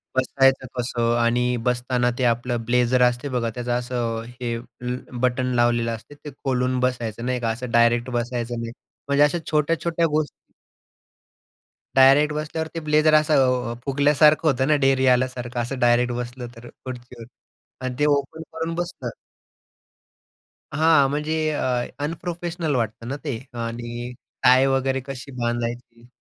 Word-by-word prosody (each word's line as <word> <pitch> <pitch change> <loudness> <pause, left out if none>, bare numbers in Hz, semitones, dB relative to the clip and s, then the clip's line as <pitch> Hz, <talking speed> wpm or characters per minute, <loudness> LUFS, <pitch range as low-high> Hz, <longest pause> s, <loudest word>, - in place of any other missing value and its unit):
बसायचं 130 0 +2
कसं? 120 -1 0
आणि 125 +1 +2
बसताना 125 0 +1
ते 130 - -1
आपलं 120 +1 +1
ब्लेझर 125 +1 +2
असते 125 +3 +1
बघा 120 -3 -1
त्याचं 120 0 -3
असं 120 -2 -2
हे 120 -1 -4
ल 125 +1 -6 0.3
बटन 125 0 +1
लावलेलं 120 -1 +2
असते. 130 +6 -14
ते 150 - -10
खोलून 130 -1 0
बसायचं, 120 -3 -2
नाही 125 0 -1
का? 115 -1 -1
असं 120 +2 -4
डायरेक्ट 120 +1 +3
बसायचं 120 -1 -2
नाही. 115 0 -5 0.4
म्हणजे 140 +1 +4
अशा 150 +4 +2
छोट्या-छोट्या 165 +2 +1
गोष्टी 155 -1 -3 1.4
डायरेक्ट 140 +3 +6
बसल्यावर 155 +1 -3
ते - - -1
ब्लेझर 155 +1 +4
असं 130 -6 +3
अ, - - -3
फुगल्यासारखं 150 +3 +4
होतं 130 0 +1
ना, 150 - +4
ढेरी 135 -1 +3
आल्यासारखं 125 -1 -3
असं 125 +2 -4
डायरेक्ट 120 0 +3
बसलं 120 0 -5
तर 115 +1 -12
खुर्चीवर 125 -2 -10 0.6
आणि 125 -1 -3
ते 150 - +3
ओपन 145 +3 -4
करून 165 +1 -4
बसलं 175 0 -4 1.6
हां. 155 -2 +4
म्हणजे 150 +2 -1 0.2
अ, 125 -4 0 0.2
अनप्रोफेशनल 170 -1 -3
वाटतं 115 -1 -2
ना 135 - -3
ते 140 -7 -3 0.3
आणि 120 +1 -5 0.5
टाय 130 +1 +6
वगैरे 135 0 0
कशी 135 0 -7
बांधायची? 120 0 -4
125 Hz, 140 wpm, -23 LUFS, 120-145 Hz, 1.6 s, डायरेक्ट